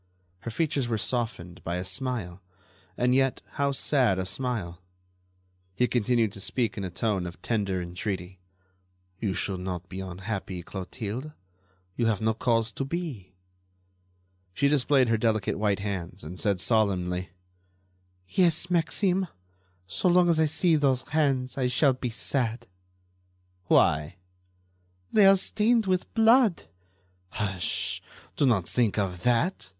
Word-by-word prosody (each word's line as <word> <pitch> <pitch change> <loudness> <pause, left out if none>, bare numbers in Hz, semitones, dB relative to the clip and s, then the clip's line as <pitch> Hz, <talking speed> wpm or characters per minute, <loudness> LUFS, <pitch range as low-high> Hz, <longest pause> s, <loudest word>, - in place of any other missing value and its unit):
Her 115 - -6
features 140 +1 -1
were 115 -2 0
softened 110 -8 -3
by 85 - -2
a 90 +1 -3
smile, 100 -4 -3 0.6
and 125 +1 +2
yet 135 0 +1
how 140 0 0
sad 130 -7 +2
a 95 - -2
smile! 95 -5 -3 0.9
He 125 +5 +2
continued 120 -2 +1
to 100 - -8
speak 115 +1 -1
in 100 - -4
a 95 - -3
tone 95 0 -1
of 85 - -10
tender 100 -5 -1
entreaty: 90 +1 -5 0.8
"You 100 -5 -1
should 95 -2 -2
not 90 -1 -5
be 95 - -6
unhappy, 95 0 -5
Clotilde; 110 - -6 0.6
you 120 - +1
have 110 -3 +1
no 110 0 +1
cause 115 0 +1
to 135 - -4
be." 135 - -5 1.2
She 140 - +3
displayed 140 -2 +3
her 115 -1 +2
delicate 110 -4 0
white 100 -2 +1
hands 95 -2 -4
and 90 +4 -8
said, 100 -3 +1
solemnly: 90 -4 0 1.0
"Yes, 175 - +2
Maxime; 180 +2 +1 0.6
so 95 - -1
long 175 0 +5
as 165 -2 +3
I 160 - +5
see 160 +2 +3
those 135 -4 +2
hands 135 -4 0
I 125 - +2
shall 130 +2 +3
be 125 -1 -4
sad." 120 0 0 1.0
"Why?" 75 +2 +3 1.0
"They 205 -3 +6
are 195 - +8
stained 220 +4 +2
with 185 -1 -1
blood." 225 -3 +5 0.7
"Hush! 95 -3 -1 0.3
Do 145 - +2
not 100 -9 +2
think 115 -1 +1
of 90 -4 -1
that!" 125 - +1
115 Hz, 140 wpm, -27 LUFS, 95-140 Hz, 1.2 s, are